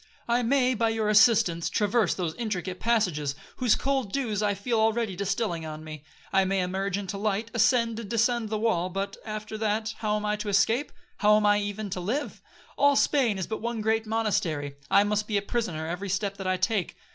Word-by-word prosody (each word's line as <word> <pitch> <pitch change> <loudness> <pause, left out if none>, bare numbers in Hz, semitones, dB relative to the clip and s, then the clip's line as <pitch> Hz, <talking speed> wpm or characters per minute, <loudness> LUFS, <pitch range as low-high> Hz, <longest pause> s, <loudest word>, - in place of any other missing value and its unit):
I 240 +1 +2
may, 255 +1 +2
by 230 -1 +1
your 220 -1 0
assistance, 210 -6 +4
traverse 215 +1 +1
those 170 -4 -2
intricate 185 -5 -4
passages, 180 -12 0 0.2
whose 245 -4 +3
cold 270 -6 -1
dews 225 -6 -1
I 205 -1 +1
feel 225 +3 -1
already 220 -2 +1
distilling 195 -2 -2
on 155 0 -7
me. 155 -2 -9 0.3
I 195 0 +5
may 190 0 0
emerge 190 +1 -2
into 200 0 -5
light, 215 +2 -1
ascend 230 0 +2
and 220 -4 -7
descend 235 0 +1
the 215 - -1
wall, 195 -5 0
but, 195 +2 -3
after 215 0 -6
that, 220 +1 -1
how 210 -1 0
am 210 0 -2
I 210 0 0
to 210 0 -4
escape?—how 225 - +1
am 215 - +1
I 205 0 +4
even 205 0 -4
to 185 - -3
live? 240 +12 -3 0.4
All 285 0 +5
Spain 255 -8 +2
is 190 - -2
but 220 - -5
one 235 0 -3
great 220 +1 0
monastery,—I 160 -8 0
must 210 0 -1
be 210 - 0
a - - +1
prisoner 200 -9 -2
every 180 +4 -4
step 200 +1 -1
that 190 -1 -5
I 185 0 +1
take.' 195 0 -1
210 Hz, 200 wpm, -27 LUFS, 195-225 Hz, 0.4 s, I